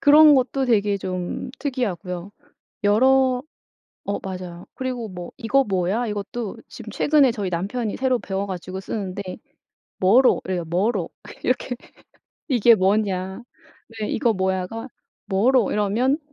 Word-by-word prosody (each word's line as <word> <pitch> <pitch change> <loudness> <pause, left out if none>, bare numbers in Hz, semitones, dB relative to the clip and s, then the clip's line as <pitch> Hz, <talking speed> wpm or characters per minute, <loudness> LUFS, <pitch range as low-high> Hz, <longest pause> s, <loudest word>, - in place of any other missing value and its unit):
그런 300 +1 +8
것도 265 +1 +1
되게 205 -4 +2
좀 185 +3 -4
특이하고요. 200 - -3 0.5
여러 255 +4 +4 0.6
어 200 - -2
맞아요. 180 -2 -7
그리고 255 -3 -4
뭐 180 -3 -8
"이거 270 +3 +2
뭐야?" 195 +4 0
이것도 210 +1 -4
지금 - - -10
최근에 285 -4 +4
저희 205 -5 -3
남편이 205 +6 -2
새로 255 -1 +2
배워 195 -1 -3
가지고 185 0 -5
쓰는데 200 -1 -4 0.8
"뭐로."래요 190 -4 +3
"뭐로." 185 +3 0 0.3
이렇게 250 0 0 0.7
이게 240 -3 +6
뭐냐. 190 0 0 0.6
네 210 - -1
"이거 235 0 +1
뭐야."가 190 +4 -2 0.4
"뭐로." 220 +3 +3
이러면 225 +7 +1
210 Hz, 270 characters per minute, -23 LUFS, 190-250 Hz, 0.8 s, 그런